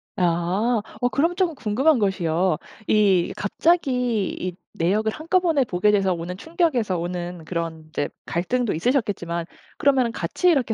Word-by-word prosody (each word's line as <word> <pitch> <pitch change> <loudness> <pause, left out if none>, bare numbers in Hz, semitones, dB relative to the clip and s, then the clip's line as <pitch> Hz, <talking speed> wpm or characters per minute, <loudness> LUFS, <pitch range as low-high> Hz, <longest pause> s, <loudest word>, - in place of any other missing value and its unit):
아. 185 +6 +1 0.2
어 245 - +2
그럼 330 +7 +1
쪼금 355 -4 0
궁금한 260 +5 +2
것이요 185 -4 +1 0.3
이 195 -5 +3
갑자기 250 - +1
이 180 -1 -4 0.2
내역을 210 +6 +1
한꺼번에 325 0 +1
보게 200 -3 +1
돼서 195 -3 +2
오는 175 +2 -5
충격에서 280 - 0
오는 175 0 -4
그런 165 -2 -4
이제 145 -2 -2 0.2
갈등도 235 +7 0
있으셨겠지만 175 - -1 0.3
그러면은 265 -4 +3
같이 230 - 0
이렇게 260 -9 +2
210 Hz, 325 characters per minute, -23 LUFS, 175-260 Hz, 0.3 s, 이